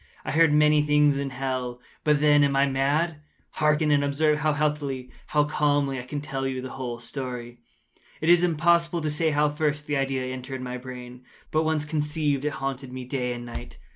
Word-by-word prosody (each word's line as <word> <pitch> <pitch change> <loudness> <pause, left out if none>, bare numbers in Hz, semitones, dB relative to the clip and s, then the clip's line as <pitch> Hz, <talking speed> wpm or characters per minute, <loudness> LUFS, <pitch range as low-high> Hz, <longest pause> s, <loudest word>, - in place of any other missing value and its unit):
I - - -2
heard 165 +1 +5
many 150 0 +5
things 150 -1 +3
in 140 -1 -2
hell. 130 -2 -3 0.2
How, 150 - +4
then, 145 0 +4
am 140 -1 +2
I 135 +1 +4
mad? 145 +4 0 0.3
Hearken! 150 0 +2
and 145 -1 +3
observe 150 +2 +2
how 155 0 +1
healthily—how 145 -1 -1
calmly 145 -2 +1
I 125 - -7
can 145 +3 -4
tell 135 -2 -3
you 130 -1 -3
the 130 +1 -6
whole 125 -3 -5
story. 120 -1 -6 0.6
It 155 - -3
is 175 0 +6
impossible 170 0 +2
to 155 -1 -1
say 160 +2 +1
how 150 0 +2
first 150 0 -1
the 145 -1 -1
idea 135 -1 -1
entered 130 0 -6
my 125 0 -4
brain; 125 0 -9 0.3
but 155 +1 +1
once 155 -1 0
conceived, 150 -2 -1
it 150 - 0
haunted 135 -1 -4
me 130 0 -6
day 125 -1 -2
and 120 0 -7
night. 60 - -8
145 Hz, 195 wpm, -26 LUFS, 130-150 Hz, 0.6 s, is